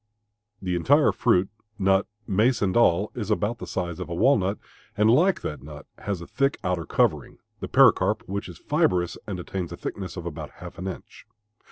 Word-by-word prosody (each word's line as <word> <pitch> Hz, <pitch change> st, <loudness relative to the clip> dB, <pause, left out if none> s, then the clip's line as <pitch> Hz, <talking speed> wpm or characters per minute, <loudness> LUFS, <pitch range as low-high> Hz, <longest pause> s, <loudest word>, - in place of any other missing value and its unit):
The 90 Hz, -1 st, -1 dB
entire 145 Hz, -, +4 dB
fruit, 95 Hz, -6 st, +2 dB, 0.3 s
nut, 95 Hz, -1 st, +2 dB, 0.2 s
mace, 110 Hz, +5 st, +2 dB
and 95 Hz, -2 st, 0 dB
all, 105 Hz, -4 st, +3 dB
is 110 Hz, -4 st, -5 dB
about 105 Hz, +2 st, 0 dB
the -, -, -7 dB
size 85 Hz, -1 st, -3 dB
of 90 Hz, -, -6 dB
a 85 Hz, -, -3 dB
walnut 100 Hz, -3 st, +3 dB, 0.4 s
and 105 Hz, +2 st, +5 dB
like 175 Hz, +10 st, +3 dB
that 75 Hz, -4 st, -5 dB
nut 75 Hz, 0 st, -10 dB
has 100 Hz, -4 st, -3 dB
a -, -, -7 dB
thick 135 Hz, +7 st, 0 dB
outer 90 Hz, -3 st, -1 dB
covering, -, -, 0 dB, 0.2 s
the -, -, -5 dB
pericarp, -, -, +4 dB
which 100 Hz, 0 st, -4 dB
is 85 Hz, -, -10 dB
fibrous 90 Hz, -2 st, +1 dB
and 95 Hz, -4 st, -4 dB
attains 90 Hz, 0 st, -5 dB
a -, -, -7 dB
thickness 95 Hz, -1 st, -6 dB
of 85 Hz, -, -6 dB
about 85 Hz, -3 st, -6 dB
half -, -, -11 dB
an 90 Hz, -, -4 dB
inch. 95 Hz, -, -9 dB
95 Hz, 190 wpm, -25 LUFS, 85-105 Hz, 0.4 s, and